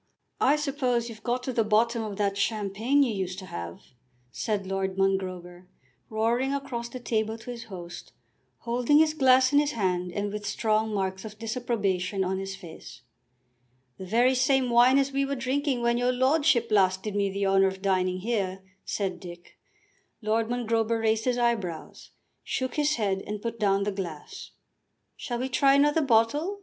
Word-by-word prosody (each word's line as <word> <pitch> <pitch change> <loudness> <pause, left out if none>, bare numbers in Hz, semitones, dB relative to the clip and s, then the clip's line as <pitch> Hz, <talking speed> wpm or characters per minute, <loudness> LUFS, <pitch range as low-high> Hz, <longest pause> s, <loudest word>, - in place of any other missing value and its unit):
"I 280 - +4
suppose 265 -5 -1
you've 220 -1 -10
got 245 +2 -2
to 260 - -3
the 230 - +2
bottom 225 +2 +2
of 210 -3 -5
that 200 -1 0
champagne 215 +6 +1
you 240 -5 0
used 185 -2 -3
to 190 - -7
have," 85 - -7 0.5
said 205 - -2
Lord 190 0 -2
Mongrober, 185 -2 -2 0.4
roaring 235 +5 0
across 240 -4 -4
the 255 - -7
table 220 -2 -1
to 230 +2 -8
his 235 -1 -8
host, 175 -3 -9 0.5
holding 245 +4 +2
his 310 0 +4
glass 260 -2 +4
in 285 - +6
his 295 0 0
hand, 180 -4 -1
and 205 +2 -3
with 210 -1 -5
strong 220 +1 0
marks 190 -2 -2
of 215 -1 -9
disapprobation 210 -5 -1
on 190 +1 -2
his 195 0 -5
face. 170 -8 -12 1.0
"The 190 - -7
very 240 +6 +3
same 260 -1 +2
wine 245 +3 +6
as 275 0 +1
we 275 0 0
were 275 0 -2
drinking 265 0 -1
when 235 0 +2
your 245 +1 +2
lordship 260 -1 +2
last 190 -2 +3
did 210 -2 -4
me 200 -1 +1
the 200 +1 -2
honour 195 0 +4
of 190 0 -5
dining 185 -1 +1
here," 195 -4 -2 0.2
said 190 -3 -3
Dick. 175 -1 -12 0.6
Lord 220 +1 0
Mongrober 230 -2 0
raised 220 0 +1
his 250 -1 +1
eyebrows, 225 -9 -2 0.3
shook 260 -1 -2
his 300 0 +1
head 195 -4 -1
and 210 0 -4
put 230 +1 -5
down 200 -2 +2
the 205 - -1
glass. 175 -6 -7 0.7
"Shall 240 - -4
we 255 +2 -2
try 275 +1 +4
another 295 +3 +3
bottle?" 290 - +1
220 Hz, 175 wpm, -27 LUFS, 195-250 Hz, 1.0 s, in